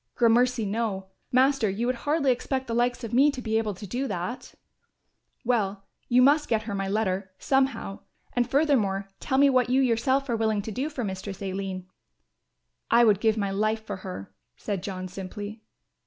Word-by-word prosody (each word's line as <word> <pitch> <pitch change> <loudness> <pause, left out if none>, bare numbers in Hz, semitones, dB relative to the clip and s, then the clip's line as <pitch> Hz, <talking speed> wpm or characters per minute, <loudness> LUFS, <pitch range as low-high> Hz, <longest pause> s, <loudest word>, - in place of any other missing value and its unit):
"Gramercy 240 0 +3
no, 200 -2 -2 0.2
Master, 260 -3 +3
you 205 +5 -2
would 255 +1 +1
hardly 295 -3 +3
expect 260 +1 -2
the 235 - -4
likes 245 +1 +1
of 230 0 -5
me 275 +4 +6
to 275 - -4
be 220 -2 0
able 215 -3 -2
to 205 - -9
do 250 +8 -2
that." 195 +4 -5 0.9
"Well, 205 -5 0 0.2
you 250 +1 +5
must 295 +3 +4
get 220 -2 +1
her 215 -2 -5
my 195 -1 -2
letter, 195 -2 -1
somehow, 270 -7 0 0.3
and, 245 0 +1
furthermore, 230 -10 +2
tell 265 - -1
me 280 +1 +6
what 255 -2 +3
you 260 +2 +3
yourself 260 +2 +2
are 240 - 0
willing 220 -2 0
to 220 - -5
do 265 +8 -2
for 275 -5 -4
Mistress 190 -1 -5
Aline." 190 -1 -4 1.0
"I 235 +1 +6
would 210 -4 +4
give 220 0 +2
my 200 -2 -1
life 215 +2 0
for 205 -3 -4
her," 140 - -8 0.2
said 200 +2 -3
John 185 -1 -5
simply. 205 +3 -7
225 Hz, 185 wpm, -26 LUFS, 195-255 Hz, 1.0 s, me